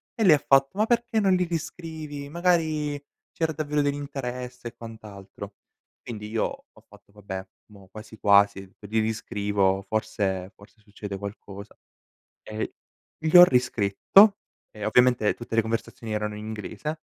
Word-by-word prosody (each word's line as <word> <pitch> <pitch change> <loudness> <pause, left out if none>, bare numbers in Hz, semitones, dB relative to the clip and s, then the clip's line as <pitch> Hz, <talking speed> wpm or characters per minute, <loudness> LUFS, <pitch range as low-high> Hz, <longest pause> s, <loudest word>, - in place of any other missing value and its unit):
e 225 - 0
lei 175 -7 +7
ha 145 - -5
fatto: 135 +5 +3
"Ma 215 - +3
perché 235 0 +1
non 195 -3 +3
li 180 - +2
riscrivi? 160 -3 -6
Magari 155 -4 0 0.3
c'era 160 -1 -1
davvero 150 -1 -1
dell'interesse", 130 -4 -4
e - - -22
quant'altro. 100 -3 -10 0.5
Quindi 105 -3 -7
io 110 0 0 0.3
ho - - -20
fatto: - - -20
"Vabbè, 95 -2 -7 0.3
mo' 100 -2 -16
quasi 110 +1 -11
quasi 100 -2 +3
gli 110 +2 -1
riscrivo 100 -3 0
forse 100 -4 -2
forse 100 +2 -19
succede 105 -2 -7
qualcosa"; 100 0 -9 0.7
e 110 0 -5 0.5
gli 160 +2 -1
ho 175 - +12
riscritto, 125 - +4 0.3
e 105 - -9
ovviamente 125 -1 +3
tutte 120 -1 -6
le 115 - +5
conversazioni 110 0 -4
erano 105 0 -2
in 105 +1 -8
inglese; 110 +9 -5
115 Hz, 145 wpm, -26 LUFS, 105-150 Hz, 0.7 s, ho